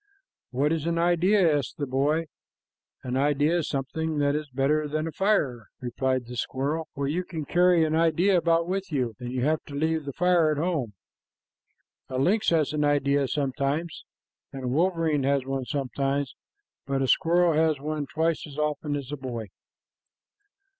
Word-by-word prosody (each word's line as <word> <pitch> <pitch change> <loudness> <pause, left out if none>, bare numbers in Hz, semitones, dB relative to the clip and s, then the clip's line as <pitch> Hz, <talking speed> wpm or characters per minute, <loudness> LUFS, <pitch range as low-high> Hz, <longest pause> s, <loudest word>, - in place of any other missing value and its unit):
"What 140 +4 0
is 165 -1 -2
an 170 0 0
idea?" 175 -1 +3
asked 140 - -7
the 145 - -2
boy. 145 +5 +1 0.8
"An 125 0 -3
idea 145 +4 +2
is 160 - -3
something 155 +4 -2
that 145 -1 +2
is 150 0 -3
better 140 +4 +1
than 155 +2 -2
a 165 - -4
fire," 150 - 0
replied 130 +1 -1
the 125 +1 -8
squirrel, 140 +6 -2
"for 140 0 -2
you 170 +6 -1
can 160 -4 -6
carry 175 0 +4
an 155 - -1
idea 165 +4 +3
about 170 -1 +2
with 190 0 -3
you, 125 -6 -1
and 125 -1 -5
you 125 -1 -2
have 155 +2 +1
to 140 - -9
leave 160 +1 0
the 140 - -5
fire 175 -1 +3
at 150 - 0
home. 150 - -1 1.2
A 130 - -3
lynx 200 +11 +2
has 155 -3 +1
an 150 -1 0
idea 140 -1 +2
sometimes, 140 +4 -2 0.5
and 135 -1 -7
a - - -2
wolverine 165 0 +1
has 135 -1 +1
one 135 -1 -3
sometimes, 140 0 -2 0.5
but 135 -1 0
a - - 0
squirrel 170 +4 +3
has 155 -2 +2
one 150 0 -3
twice 160 0 -1
as 145 -1 -11
often 150 -1 -1
as 140 -1 -5
a 145 - -3
boy." 120 -5 -6
150 Hz, 175 wpm, -26 LUFS, 135-165 Hz, 1.2 s, carry